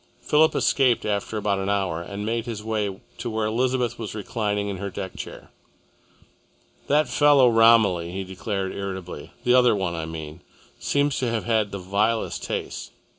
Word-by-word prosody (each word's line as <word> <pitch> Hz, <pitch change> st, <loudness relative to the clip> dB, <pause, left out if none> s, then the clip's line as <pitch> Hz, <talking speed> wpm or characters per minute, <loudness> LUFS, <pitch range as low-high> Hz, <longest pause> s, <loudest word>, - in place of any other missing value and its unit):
Philip 155 Hz, +1 st, +3 dB
escaped 130 Hz, -4 st, +2 dB
after 105 Hz, +1 st, -2 dB
about 100 Hz, -2 st, 0 dB
an 95 Hz, +1 st, -2 dB
hour 95 Hz, -5 st, 0 dB
and 100 Hz, +4 st, -6 dB
made 115 Hz, +2 st, -2 dB
his 110 Hz, -3 st, -5 dB
way 105 Hz, -3 st, -2 dB, 0.2 s
to -, -, -3 dB
where 110 Hz, -1 st, -1 dB
Elizabeth 120 Hz, +1 st, 0 dB
was 110 Hz, -2 st, -5 dB
reclining 105 Hz, -1 st, -2 dB
in 100 Hz, -1 st, -3 dB
her 100 Hz, +2 st, -4 dB
deck 95 Hz, 0 st, -6 dB
chair. -, -, -9 dB, 1.4 s
"That 150 Hz, 0 st, +3 dB
fellow 140 Hz, +1 st, +5 dB
Romilly," 115 Hz, -7 st, +4 dB
he 95 Hz, +1 st, -4 dB
declared 95 Hz, 0 st, -3 dB
irritably, 95 Hz, -5 st, -6 dB
"the 125 Hz, -, +3 dB
other 125 Hz, -3 st, +5 dB
one, 95 Hz, -4 st, -2 dB
I 80 Hz, -1 st, -4 dB
mean, 80 Hz, 0 st, -7 dB, 0.4 s
seems 145 Hz, -1 st, +1 dB
to 125 Hz, -, 0 dB
have 115 Hz, -1 st, -1 dB
had 110 Hz, -3 st, +1 dB
the 100 Hz, -, -4 dB
vilest 105 Hz, +5 st, -1 dB
tastes. -, -, -4 dB
105 Hz, 170 wpm, -24 LUFS, 95-115 Hz, 1.4 s, fellow